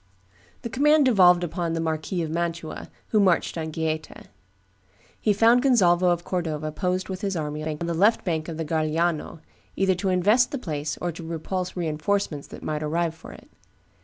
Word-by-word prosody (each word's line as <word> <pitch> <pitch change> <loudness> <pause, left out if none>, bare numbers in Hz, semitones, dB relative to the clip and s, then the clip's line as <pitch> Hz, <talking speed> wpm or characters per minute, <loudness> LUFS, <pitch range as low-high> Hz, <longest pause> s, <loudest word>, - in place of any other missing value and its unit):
The 235 - -4
command 295 +3 +4
devolved 180 -7 +5
upon 170 0 -2
the 165 - -1
Marquis 160 +2 -2
of 155 - -4
Mantua, 170 -1 -4 0.2
who 215 - +3
marched 185 -4 +2
on 160 -1 -3
Gaeta. 155 -1 -4 0.9
He 215 - +2
found 230 +4 +5
Gonzalvo 185 -9 +4
of 175 -1 0
Cordova 155 -5 -3
posted 180 +4 -2
with 190 0 -5
his 195 -2 -2
army 150 -1 -3
on 155 -1 -3
the 170 - -1
left 205 +7 +3
bank 160 -3 -1
of 165 -2 -5
the 165 - -3
Garigliano, 160 +1 -1 0.3
either 190 -1 +2
to 190 +2 -2
invest 205 +7 +3
the 280 - -3
place 155 - -4
or 175 - -2
to 165 +1 -9
repulse 170 +3 -4
re 175 -2 -2
enforcements 155 -1 -1
that - - -11
might 155 0 -3
arrive 165 +2 -1
for 160 - -12
it. - - -14
170 Hz, 185 wpm, -25 LUFS, 160-190 Hz, 0.9 s, devolved